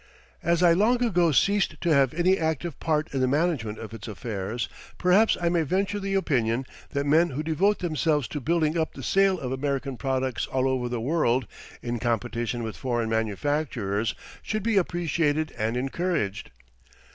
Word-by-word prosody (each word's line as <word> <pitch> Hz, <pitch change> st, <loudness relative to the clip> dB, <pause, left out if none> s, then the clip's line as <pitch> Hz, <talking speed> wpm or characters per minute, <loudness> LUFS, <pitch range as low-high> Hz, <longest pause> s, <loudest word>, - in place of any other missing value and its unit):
As 170 Hz, +1 st, +2 dB
I 170 Hz, -1 st, +7 dB
long 235 Hz, +7 st, +3 dB
ago 175 Hz, -8 st, +3 dB
ceased 200 Hz, +7 st, +2 dB
to 170 Hz, -3 st, +2 dB
have 135 Hz, -3 st, +4 dB
any 180 Hz, +3 st, +3 dB
active 160 Hz, -2 st, -2 dB
part 155 Hz, -1 st, -1 dB
in 135 Hz, -, 0 dB
the 130 Hz, -, +2 dB
management 140 Hz, -7 st, 0 dB
of 110 Hz, 0 st, -8 dB
its 115 Hz, -2 st, -8 dB
affairs 110 Hz, +1 st, -4 dB, 0.3 s
perhaps 190 Hz, +5 st, +4 dB
I 175 Hz, -, 0 dB
may 170 Hz, -1 st, +2 dB
venture 195 Hz, +6 st, 0 dB
the 195 Hz, 0 st, -2 dB
opinion 130 Hz, -9 st, +1 dB, 0.2 s
that 140 Hz, -1 st, -2 dB
men 160 Hz, +4 st, +4 dB
who 145 Hz, +3 st, -3 dB
devote 185 Hz, +7 st, +2 dB
themselves 155 Hz, -5 st, 0 dB
to 150 Hz, -, -4 dB
building 160 Hz, +2 st, +1 dB
up 160 Hz, -, -2 dB
the -, -, -8 dB
sale 195 Hz, -1 st, +3 dB
of 130 Hz, -2 st, -4 dB
American 135 Hz, -1 st, -2 dB
products 130 Hz, -1 st, -1 dB
all 130 Hz, 0 st, 0 dB
over 130 Hz, -2 st, -1 dB
the 120 Hz, -1 st, -2 dB
world, 130 Hz, -2 st, +1 dB, 0.4 s
in 120 Hz, -1 st, -2 dB
competition 115 Hz, +1 st, -1 dB
with 110 Hz, -1 st, -5 dB
foreign 120 Hz, -3 st, -1 dB
manufacturers 110 Hz, -2 st, -1 dB, 0.3 s
should 215 Hz, -2 st, -3 dB
be 225 Hz, -1 st, +1 dB
appreciated 165 Hz, -4 st, 0 dB
and 110 Hz, +3 st, -1 dB
encouraged. 130 Hz, -, -2 dB
145 Hz, 170 wpm, -26 LUFS, 120-175 Hz, 0.4 s, I